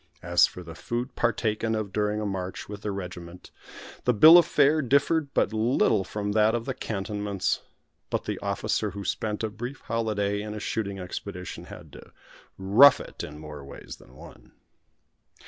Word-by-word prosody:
As 85 0 +4
for 90 - -10
the 80 -1 -9
food 120 +8 -4
partaken 115 -1 0
of 105 -3 -4
during 105 0 0
a 105 - -3
march 95 -2 -4
with 105 -1 -8
the 105 - -3
regiment, 90 -2 -7 0.5
the 125 - +3
bill 160 +10 +10
of 170 - +2
fare 150 +1 +3
differed 140 +3 +1
but 105 - +2
little 110 -2 +2
from 105 +1 -4
that 110 +2 +3
of 115 -1 -3
the 130 - -2
cantonments; 105 -3 -2 0.5
but - - -2
the - - -3
officer 105 - -1
who 100 +1 -7
spent 105 +3 -2
a 110 - 0
brief 120 +5 -7
holiday 105 -3 -1
in 105 0 -6
a - - -5
shooting 100 -2 -3
expedition 90 0 -7
had - - -12
to - - -13 0.5
"rough 110 +9 +7
it" - - -8
in 75 0 -8
more 75 -2 -9
ways 70 - -10
than 65 - -19
one. - - -15
105 Hz, 175 wpm, -26 LUFS, 95-115 Hz, 0.5 s, bill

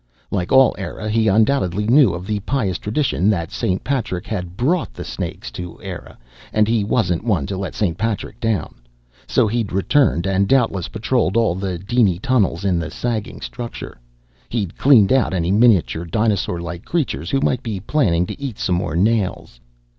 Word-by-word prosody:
Like 90 -3 -2
all 130 -1 +6
Eire, 105 +2 -5
he 110 +1 +2
undoubtedly 105 -2 +2
knew 125 -1 +5
of 90 +1 -6
the 105 +1 -1
pious 100 -5 -1
tradition 105 -3 0
that 85 -6 -1
St. 95 0 -1
Patrick 110 -8 -2
had 90 -5 -5
brought 150 - 0
the - - -6
snakes 60 - -6
to 90 +8 -8
Eire, - - -8 0.3
and 105 -1 +2
he 115 -2 +1
wasn't 100 -5 0
one 95 - 0
to 95 - -4
let 95 -1 -5
St. 90 -6 0
Patrick 110 0 -3
down. 110 -7 -1 0.5
So - - +3
he'd 110 -1 -1
returned 95 - +2
and 95 0 +1
doubtless 115 -9 +2
patrolled 110 -2 0
all 115 -6 +3
the 95 -1 -3
diny 100 -1 +1
tunnels 100 -6 0
in 90 -3 +2
the 80 - -4
sagging 115 -4 -4
structure. 60 - -7 0.5
He'd 100 -7 -3
cleaned 125 -6 +5
out 130 -7 +2
any 85 0 0
miniature, 100 -6 +3
dinosaurlike 90 -4 -1
creatures 145 - -2
who 135 - +1
might 130 -2 0
be 110 -6 -4
planning 95 - +1
to 140 - -8
eat 135 -6 -4
some 90 - -1
more 85 -2 -3
nails. 100 - 0
105 Hz, 175 wpm, -20 LUFS, 90-115 Hz, 0.5 s, all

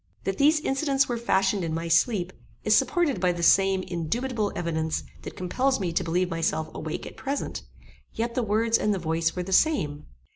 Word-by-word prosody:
That 195 0 -3
these 305 +2 +5
incidents 275 -1 +1
were 240 - -1
fashioned 195 -3 +1
in 160 -1 -2
my 165 +1 -3
sleep, 175 +2 +2 0.3
is - - +4
supported 310 - +1
by 180 -1 +3
the 170 0 -5
same 195 +2 +4
indubitable 210 +7 -2
evidence 160 -2 -2 0.2
that - - -8
compels 260 +9 0
me 180 -4 -2
to 185 - +1
believe 180 +2 0
myself 165 -1 -1
awake 155 0 -5
at - - -9
present; 280 +1 -3 0.5
yet 235 +1 -3
the 250 - 0
words 225 +1 +2
and 210 -1 +1
the - - -2
voice 165 -1 -1
were 180 - -2
the 190 +2 -4
same. 150 - +1
190 Hz, 190 wpm, -26 LUFS, 165-240 Hz, 0.5 s, these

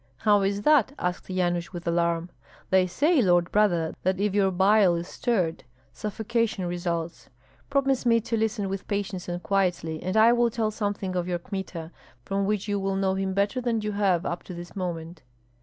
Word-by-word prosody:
"How 205 - +3
is 200 +1 -1
that?" 280 -3 +4
asked 180 +1 -3
Yanush, 175 -1 -1
with 175 -1 -7
alarm. 170 0 0 0.4
"They 185 -1 +4
say, 285 - +2
lord 175 -4 +3
brother, 175 -6 +2
that 185 +1 0
if 205 -1 +1
your 200 -1 +3
bile 190 0 +4
is 170 +1 -4
stirred 185 -10 -1 0.3
suffocation 220 -1 -2
results. 170 -1 -3 0.4
Promise 270 -2 +1
me 230 -1 +5
to 230 +1 -2
listen 220 -2 0
with 195 0 -5
patience 200 -3 -3
and 175 0 -4
quietly, 175 -5 0
and 185 +4 -1
I 225 +2 +7
will 240 0 +3
tell 220 -1 -1
something 205 -3 -3
of 175 -1 -1
your 175 -1 0
Kmita, 175 -2 -6 0.3
from 195 +3 -1
which 210 0 -1
you 205 -1 0
will 195 0 -1
know 195 -1 +1
him 190 0 -2
better 200 +5 +1
than 235 -2 0
you 210 0 -2
have 195 -4 +1
up 170 - -3
to 180 - -8
this 175 0 -9
moment." 170 -3 -5
195 Hz, 190 wpm, -26 LUFS, 175-210 Hz, 0.4 s, I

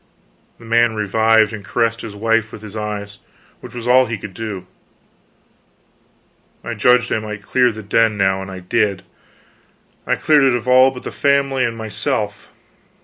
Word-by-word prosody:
The 115 - -15
man 115 0 +2
revived 110 +1 +2
and 105 -2 -7
caressed 115 +3 -1
his 105 -2 -8
wife 115 +1 0
with 110 - -11
his 105 0 -10
eyes, 105 -1 -5 0.4
which - - -12
was 120 -1 -6
all 130 +1 +5
he 115 - -3
could 100 -1 -9
do. 105 -3 -6 2.0
I - - -4
judged 125 -1 +3
I - - +1
might 105 -1 -7
clear 125 +3 +2
the 110 0 -9
den, 110 +1 +2
now, 95 -1 +1
and 95 - -8
I 95 -1 -8
did; 100 +1 0 1.0
cleared 150 -2 +3
it 130 -2 +3
of 120 0 -4
all 130 +1 +6
but 130 -1 -10
the - - -6
family 140 -2 +1
and 115 -1 -2
myself. 110 -2 -3
110 Hz, 165 wpm, -19 LUFS, 105-120 Hz, 2.0 s, all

